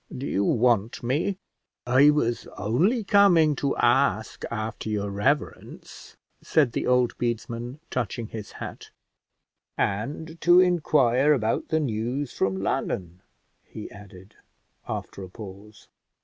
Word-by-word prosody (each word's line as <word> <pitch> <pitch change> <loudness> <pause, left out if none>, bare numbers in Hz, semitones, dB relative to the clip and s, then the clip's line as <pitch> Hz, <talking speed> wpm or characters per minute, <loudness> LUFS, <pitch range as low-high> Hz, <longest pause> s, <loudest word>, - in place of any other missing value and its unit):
do 130 - -5
you 100 - 0
want 115 0 +1
me?" 155 +11 0 0.5
"I 130 +4 +5
was 120 -6 0
only 165 - +1
coming 180 -7 +5
to 140 - -1
ask 120 -2 +1
after 110 0 -4
your 100 -1 -2
reverence," 105 +9 -3 0.2
said 145 -7 +2
the - - -2
old 125 -1 +2
bedesman, 120 +2 -3
touching 120 -1 -2
his 110 -2 -8
hat; - - -8 0.9
"and 150 +11 -3
to 175 +1 +6
inquire 150 -6 +3
about 115 -5 -1
the 160 - +1
news 125 +1 -2
from 95 0 0
London," 90 -2 -3 0.4
he 105 - -9
added 100 -1 -14 0.5
after - - -5
a 95 - -8
pause. 100 +1 -12
120 Hz, 120 wpm, -25 LUFS, 105-150 Hz, 0.9 s, to